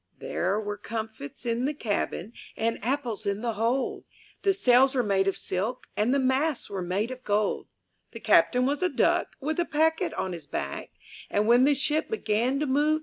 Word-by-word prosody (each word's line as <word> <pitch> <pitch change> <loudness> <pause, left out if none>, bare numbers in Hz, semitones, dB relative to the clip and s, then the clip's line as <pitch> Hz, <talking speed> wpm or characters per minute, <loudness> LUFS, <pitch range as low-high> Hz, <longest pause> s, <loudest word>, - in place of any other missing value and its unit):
There 190 +4 -1
were 205 -1 -4
comfits 220 - -6
in 235 +1 0
the 295 +2 -1
cabin, 220 -1 -2 0.2
And 225 -2 -1
apples 240 -5 -2
in 200 +1 -1
the 235 -1 -1
hold; 230 +5 -1 0.4
The 395 - +3
sails 265 -6 +4
were 250 - +2
made 195 -2 +2
of 195 - +1
silk, 215 +7 -2
And 215 +4 +1
the 275 - +3
masts 265 +1 0
were 195 -2 -3
made 195 +7 -1
of 255 0 -8
gold 205 0 0 0.4
The - - -8
Captain 250 0 +4
was 285 +4 0
a 365 - +2
duck, - - +2
\''l 270 - -11
With 315 +2 -1
a 345 - +2
packet 320 +1 +1
on 185 - -2
his 160 -4 -8
back; 70 - -4 0.4
And 205 +1 +1
when 240 +3 +6
the 290 0 +4
ship 300 +3 0
began 250 - 0
to - - +1
move. 295 +3 +2
240 Hz, 200 wpm, -27 LUFS, 210-275 Hz, 0.4 s, when